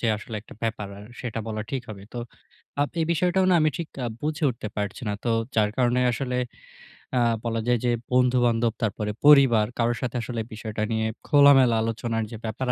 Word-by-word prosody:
যে - - 0
আসলে 110 +2 -9
একটা - - -14
ব্যাপার 110 -3 -2
আর, 100 - -11 0.2
সেটা 115 -3 -4
বলা 110 -1 -3
ঠিক 130 -3 -2
হবে? 100 -2 -9
তো - - -3 0.6
আব 145 - -2
এই 160 - +1
বিষয়টাও 180 +3 +2
না - - +5
আমি 155 0 +3
ঠিক 165 - -4 0.2
আ - - -1 0.2
বুঝে 155 +1 -1
উঠতে 115 -3 -6
পারছি 105 +4 -3
না। 105 - 0
তো 120 - 0 0.3
যার 105 -1 +3
কারণে 125 0 +3
আসলে, 125 +1 -2 0.8
আ - - +4 0.3
বলা 115 -1 -1
যায় 120 0 +3
যে, - - +3 0.2
বন্ধু-বান্ধব 120 -2 +3
তারপরে 105 0 -1
পরিবার, 135 -7 +7
কারো 120 0 +2
সাথে 125 -1 -3
আসলে 120 -2 -3
বিষয়টা 110 0 -5
নিয়ে 110 0 0 0.2
খোলামেলা 140 -4 +6
আলোচনার 115 0 -2
যে 115 - -6
ব্যাপার 110 +4 -3
120 Hz, 195 wpm, -25 LUFS, 110-130 Hz, 0.8 s, পরিবার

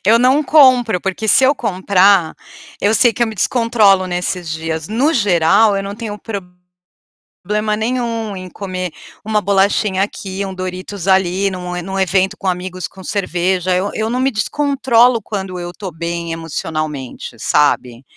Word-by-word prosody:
Eu 230 +2 +6
não 260 +5 +3
compro, 255 - +4
porque 195 +4 -3
se 265 - +5
eu 270 +3 +4
comprar, 195 - +2 0.5
eu 205 +2 +2
sei 235 +1 +4
que 240 - -1
eu - - +3
me 220 - -6
descontrolo 215 -7 +3
nesses 180 -1 -3
dias. 160 0 -4
No 260 +9 +1
geral, 200 - +3
eu 195 - -2
não 200 +1 -6
tenho 210 -2 -6 1.1
problema 210 +2 -3
nenhum 230 -2 -2
em 185 -1 -8
comer 185 -2 -5 0.3
uma 215 -1 +1
bolachinha 195 0 +1
aqui, 195 -1 -5
um 190 - -6
Doritos 185 +1 -6
ali, 190 +1 +2
num 180 -1 -5
num 195 +2 -4
evento 190 +2 +1
com 195 - -5
amigos, 185 0 -3
com 190 - -14
cerveja. 185 -2 -1
Eu 190 +3 -1
eu 220 +1 -2
não 250 - -1
me 265 +1 +2
descontrolo 250 -1 +2
quando 190 -3 -5
eu 175 0 -5
estou 190 0 -7
bem 170 +1 -4
emocionalmente, 155 -6 -5
sabe. 125 -4 +1
195 Hz, 160 wpm, -17 LUFS, 180-220 Hz, 1.1 s, Eu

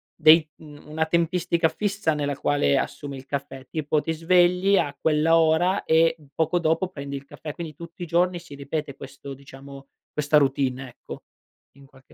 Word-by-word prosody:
dei 155 0 +6
mhmm, 150 -2 -14
una 160 +1 0
tempistica 170 0 +1
fissa 200 -5 -1
nella 145 -1 -2
quale 140 - +1
assumi 140 -1 -4
il 130 - -11
caffè? 135 -1 -6
Tipo, 155 -1 -1
ti 160 - -2
svegli 180 +4 +3
a 145 -5 0
quell'ora 165 +4 +3
e 165 +1 +4 0.2
poco 165 +2 +1
dopo 165 +2 +1
prendi 140 -5 -7
il 140 0 -7
caffè, 150 +2 -8
quindi 165 -1 -7
tutti 170 +2 -12
i - - -3
giorni 175 +2 +1
si 170 -3 -13
ripete 140 0 -5
questo 140 0 -10
diciamo 135 0 -13 0.2
questa 150 0 +2
routine, 135 -2 0
ecco, - - -11 0.5
in 140 0 -18
qualche 135 -1 -21
155 Hz, 170 wpm, -24 LUFS, 140-170 Hz, 0.5 s, dei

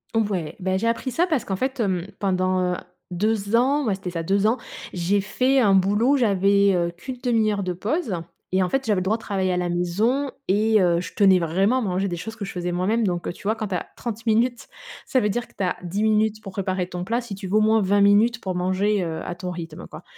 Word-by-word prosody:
Ouais. 190 -8 -1
Bah, 190 0 0
j'ai 230 +4 -1
appris 240 +3 -1
ça 345 +8 +1
parce 310 -8 0
qu'en 190 - -2
fait, 260 +4 -2
hem, 190 -4 0
pendant, 185 -2 +1
heu, - - -3 0.3
2 205 +3 0
ans, 275 +4 +2
ouais, 200 -3 +1
c'était 190 -2 -6
ça 165 -1 -3
2 200 +4 +2
ans, 235 +4 +2 0.4
j'ai 185 +3 +1
fait 255 +7 +1
un 205 -5 +4
boulot, 205 +9 +3
j'avais, 200 -3 +3
heu, 170 -1 0
qu'une 210 +9 -8
1/2 225 -3 +2
heure 200 -1 -2
de 180 -1 -2
pause 215 - -2 0.4
et 185 0 +3
en 180 - -1
fait, 270 -1 -1
j'avais 205 -4 +1
le - - -2
droit 215 +4 +1
de - - -16
travailler 190 -2 -1
à 180 - 0
la 180 0 0
maison 210 +11 0 0.2
et 215 +2 +3
heu, 170 -1 +2
je 165 - -8
tenais 195 -3 +5
vraiment 190 +9 +1
à - - -2
manger 195 -1 -1
des 175 - -3
choses 220 +6 -7
que 200 - -4
je - - -6
faisais 175 0 -3
moi-même 210 +6 +1
donc, 175 -2 -2
heu, - - -3
tu - - -16
vois? 215 +3 +1
Quand 215 -2 -4
tu 185 - -3
as - - -3
30 230 -1 -5
minutes, 235 +2 +1 0.4
ça 260 - +2
veut 210 - +1
dire 240 +4 -2
que - - -24
tu 195 - -1
as 180 - 0
10 190 +4 -3
minutes 215 0 +2
pour 195 -2 -9
préparer 185 -2 -2
ton 180 -1 -5
plat 230 +5 0
si 235 -5 -7
tu 195 -1 -7
veux 200 - -1
au - - +6
moins 220 0 +4
20 200 +1 +2
minutes 215 +3 +4
pour 185 -4 -4
manger, 190 +2 +1
heu, 160 -1 -4
à 175 - -4
ton 180 0 -5
rythme, 165 -2 -7
quoi, - - -11
200 Hz, 260 wpm, -23 LUFS, 180-225 Hz, 0.4 s, au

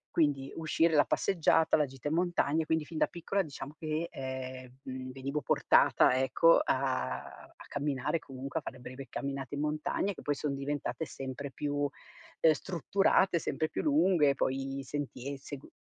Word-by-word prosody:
Quindi, 145 -4 +2
uscire, 165 +1 +2
la 145 - +7
passeggiata, 165 -3 +3
la 150 - +3
gita 135 0 -7
in - - -1
montagna. 165 -3 +1
Quindi 160 -1 0
fin 160 +1 -7
da - - +3
piccola, 185 +3 -1
diciamo 145 -2 -8
che, 155 +1 -2
ehm, 130 -1 -6
mhmm, 130 0 -6
venivo 140 +3 -3
portata, 130 - +4
ecco, 150 +5 +5
a 130 - 0
a - - -13
camminare, 145 +2 -1
comunque, 135 +3 -5
a - - -15
fare 130 - -7
breve 130 +2 -8
camminate 140 -1 -4
in 145 - -2
montagna, 150 +6 -1
che - - -11
poi 145 - +1
son 140 0 -2
diventate 140 0 -3
sempre 135 0 -6
più, 145 +1 -3
uhm, 145 +2 -1
strutturate, 185 +2 +2
sempre 155 - -1
più - - -2
lunghe, 190 - +4
e - - -2
poi 135 +1 -1
sentie 140 0 -4
segu 140 +1 -9
145 Hz, 165 wpm, -31 LUFS, 135-160 Hz, -, la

